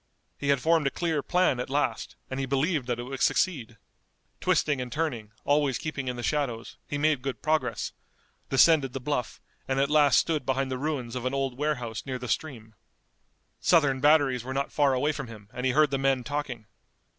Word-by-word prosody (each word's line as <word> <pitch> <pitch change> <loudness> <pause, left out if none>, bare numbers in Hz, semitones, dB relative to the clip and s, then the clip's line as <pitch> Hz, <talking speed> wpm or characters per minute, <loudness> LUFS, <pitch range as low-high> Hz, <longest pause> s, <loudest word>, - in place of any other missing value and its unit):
He 140 - -3
had 140 -1 +3
formed 160 +1 +2
a - - +3
clear 160 -1 -1
plan 180 -5 +2
at 125 - -4
last, 135 -5 -1
and 130 - -4
he 135 - -2
believed 140 +1 0
that 120 -2 -1
it 120 - -5
would 130 +1 -6
succeed. 125 -11 +1 0.6
Twisting 145 -4 +1
and 125 -1 -6
turning, 125 -10 -3
always 145 -2 +2
keeping 140 -4 -4
in 125 - -2
the 120 - -6
shadows, 135 -7 -2
he 145 - -3
made 150 -2 +2
good 135 0 -5
progress, 155 0 0 0.6
descended 135 0 +4
the 135 - -3
bluff, 130 -2 -3 0.3
and 135 0 0
at 140 +1 +1
last 150 -2 +5
stood 155 -4 +1
behind 130 +1 -1
the 130 - -2
ruins 135 -5 -3
of 125 -1 -4
an 130 +2 -1
old 135 -2 -1
warehouse 125 -6 -2
near 130 -1 -4
the 125 0 -7
stream. 115 -7 -3 0.9
Southern 145 -6 +3
batteries 145 -4 +4
were 130 +1 -5
not 140 0 -1
far 140 -3 +3
away 145 +4 +1
from 140 -3 -6
him 105 -3 -12
and 125 +1 -2
he - - +3
heard 150 +2 +3
the 135 - 0
men 135 -2 +1
talking. 140 -5 -4
135 Hz, 200 wpm, -27 LUFS, 125-150 Hz, 0.9 s, last